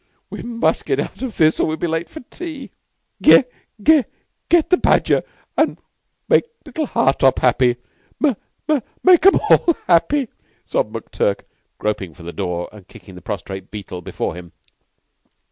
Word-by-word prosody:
We -, -, -6 dB
must 235 Hz, -1 st, -1 dB
get -, -, 0 dB
out -, -, -5 dB
of 255 Hz, -5 st, -5 dB
this 155 Hz, 0 st, +3 dB
or -, -, +2 dB
we'll 155 Hz, 0 st, -2 dB
be -, -, -2 dB
late 165 Hz, 0 st, -2 dB
for 315 Hz, -, -10 dB
tea." 305 Hz, +1 st, -8 dB, 0.5 s
"Ge 270 Hz, -, +7 dB, 0.3 s
Ge 300 Hz, +5 st, +5 dB, 0.5 s
get 340 Hz, 0 st, +3 dB
the 365 Hz, -, +6 dB
badger -, -, +3 dB, 0.3 s
and -, -, +1 dB, 0.5 s
make -, -, +4 dB, 0.2 s
little 310 Hz, -3 st, -3 dB
Hartopp 135 Hz, -, +2 dB
happy. 125 Hz, -1 st, +3 dB, 0.4 s
Ma 295 Hz, -4 st, +3 dB, 0.3 s
ma 305 Hz, -2 st, +3 dB, 0.2 s
make 365 Hz, -2 st, +6 dB
'em 390 Hz, -, +6 dB
all 340 Hz, -, +5 dB
happy," 235 Hz, -, +2 dB, 0.4 s
sobbed 110 Hz, +2 st, -2 dB
McTurk, 105 Hz, -2 st, -1 dB, 0.4 s
groping 95 Hz, -6 st, -3 dB
for 85 Hz, -, -14 dB
the 85 Hz, +1 st, -7 dB
door 90 Hz, -3 st, -3 dB
and 105 Hz, -4 st, -15 dB
kicking 95 Hz, -4 st, -14 dB
the 90 Hz, -, -12 dB
prostrate 95 Hz, -3 st, -6 dB
Beetle 100 Hz, -4 st, -7 dB
before 85 Hz, -, -4 dB
him. 85 Hz, -1 st, -11 dB
135 Hz, 160 wpm, -20 LUFS, -, 0.5 s, Ge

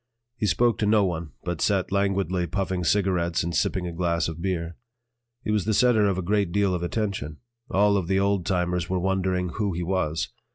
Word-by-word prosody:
He 105 Hz, -, -1 dB
spoke 120 Hz, +2 st, +2 dB
to 105 Hz, -, +1 dB
no 105 Hz, -1 st, +4 dB
one, 85 Hz, -5 st, -4 dB
but 90 Hz, -3 st, -3 dB
sat 95 Hz, -3 st, +1 dB
languidly 95 Hz, -3 st, 0 dB
puffing 95 Hz, +1 st, -2 dB
cigarettes 90 Hz, -2 st, +1 dB
and 85 Hz, +1 st, -3 dB
sipping 90 Hz, +2 st, 0 dB
a 85 Hz, -, -3 dB
glass 85 Hz, 0 st, 0 dB
of 80 Hz, 0 st, -6 dB
beer. 85 Hz, -2 st, -2 dB, 0.7 s
He 105 Hz, -, -1 dB
was 105 Hz, -4 st, +1 dB
the 110 Hz, -, +1 dB
center 110 Hz, -2 st, +4 dB
of 95 Hz, -2 st, 0 dB
a 95 Hz, -, -2 dB
great 100 Hz, -1 st, +1 dB
deal 100 Hz, 0 st, +2 dB
of 90 Hz, -, -2 dB
attention; 85 Hz, -6 st, -3 dB, 0.3 s
all 100 Hz, +1 st, +3 dB
of 90 Hz, -4 st, -2 dB
the 95 Hz, +1 st, +2 dB
old 100 Hz, -2 st, +1 dB
timers 90 Hz, -1 st, -1 dB
were 95 Hz, -, 0 dB
wondering 95 Hz, -1 st, 0 dB
who 100 Hz, +1 st, -2 dB
he 85 Hz, +1 st, -3 dB
was. 85 Hz, -3 st, -1 dB
95 Hz, 205 wpm, -25 LUFS, 85-100 Hz, 0.7 s, no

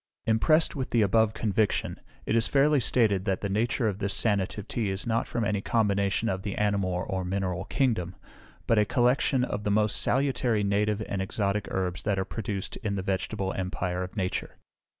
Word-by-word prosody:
Impressed 155 Hz, +9 st, +3 dB
with 130 Hz, -3 st, -3 dB
the 115 Hz, -2 st, +3 dB
above 110 Hz, +2 st, +3 dB
conviction, 110 Hz, -1 st, 0 dB, 0.3 s
it 110 Hz, -, 0 dB
is 115 Hz, -1 st, +3 dB
fairly 145 Hz, +1 st, +4 dB
stated 105 Hz, -6 st, +2 dB
that 95 Hz, -3 st, 0 dB
the 100 Hz, -, -2 dB
nature 115 Hz, +4 st, 0 dB
of 100 Hz, -2 st, -2 dB
this 100 Hz, -1 st, -1 dB
sanative 100 Hz, -1 st, -1 dB
tea 110 Hz, -4 st, -1 dB
is 95 Hz, 0 st, -4 dB
not 115 Hz, -1 st, 0 dB
from 115 Hz, -2 st, -1 dB
any 105 Hz, -1 st, 0 dB
combination 100 Hz, -1 st, +1 dB
of 95 Hz, -3 st, -1 dB
the 100 Hz, 0 st, -4 dB
animal 100 Hz, -4 st, 0 dB
or 95 Hz, -1 st, -2 dB
mineral 95 Hz, 0 st, -2 dB
kingdom, 95 Hz, -10 st, 0 dB, 0.5 s
but 115 Hz, -, +3 dB
a 105 Hz, -, +4 dB
collection 125 Hz, +2 st, +2 dB
of 105 Hz, -4 st, -3 dB
the 105 Hz, -, -1 dB
most 105 Hz, +1 st, +1 dB
salutary 125 Hz, -5 st, +1 dB
native 105 Hz, +2 st, +1 dB
and 100 Hz, -, -2 dB
exotic 100 Hz, 0 st, -1 dB
herbs 90 Hz, -2 st, -2 dB
that 100 Hz, -2 st, 0 dB
are 95 Hz, -, 0 dB
produced 100 Hz, -3 st, -4 dB
in 105 Hz, -4 st, -3 dB
the 95 Hz, -, -3 dB
vegetable 95 Hz, 0 st, -2 dB
empire 90 Hz, -1 st, -2 dB
of 90 Hz, +3 st, -6 dB
nature. 95 Hz, -2 st, -3 dB
105 Hz, 190 wpm, -27 LUFS, 95-115 Hz, 0.5 s, fairly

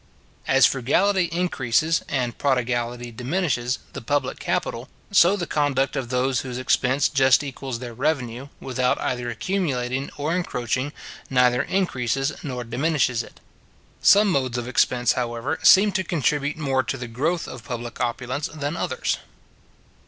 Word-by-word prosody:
As 135 Hz, 0 st, +6 dB
frugality 180 Hz, +9 st, +2 dB
increases, 165 Hz, -3 st, +1 dB
and 125 Hz, -4 st, -1 dB
prodigality 120 Hz, -2 st, -1 dB
diminishes, 125 Hz, 0 st, -1 dB, 0.2 s
the -, -, -6 dB
public 135 Hz, +2 st, -1 dB
capital, 120 Hz, +4 st, -2 dB, 0.2 s
so 185 Hz, 0 st, +6 dB
the 180 Hz, -4 st, -3 dB
conduct 145 Hz, -4 st, 0 dB
of 130 Hz, -3 st, -3 dB
those 130 Hz, +1 st, +1 dB
whose 125 Hz, -2 st, -6 dB
expense 130 Hz, +1 st, +2 dB
just 135 Hz, 0 st, +4 dB
equals 135 Hz, -2 st, -5 dB
their 120 Hz, 0 st, -7 dB
revenue, 130 Hz, -1 st, -2 dB
without 130 Hz, -1 st, 0 dB
either 125 Hz, -1 st, -2 dB
accumulating 130 Hz, -, -2 dB
or 150 Hz, +4 st, -1 dB
encroaching, 130 Hz, -5 st, -2 dB, 0.4 s
neither 125 Hz, -1 st, +3 dB
increases 135 Hz, -, -1 dB
nor 125 Hz, -4 st, -4 dB
diminishes 125 Hz, 0 st, 0 dB
it. -, -, -13 dB, 0.6 s
Some 205 Hz, +1 st, +6 dB
modes 130 Hz, -7 st, 0 dB
of 120 Hz, 0 st, -3 dB
expense, 125 Hz, -1 st, +2 dB
however, 120 Hz, -2 st, -2 dB
seem 205 Hz, +2 st, +7 dB
to 190 Hz, -, 0 dB
contribute 150 Hz, -3 st, 0 dB
more 135 Hz, -4 st, +1 dB
to 130 Hz, +1 st, -3 dB
the 120 Hz, -1 st, -6 dB
growth 155 Hz, +9 st, -1 dB
of 125 Hz, -3 st, -9 dB
public 120 Hz, -2 st, -6 dB
opulence 125 Hz, +4 st, -2 dB
than 145 Hz, +1 st, -4 dB
others. 130 Hz, -6 st, -1 dB
130 Hz, 140 wpm, -23 LUFS, 125-150 Hz, 0.6 s, seem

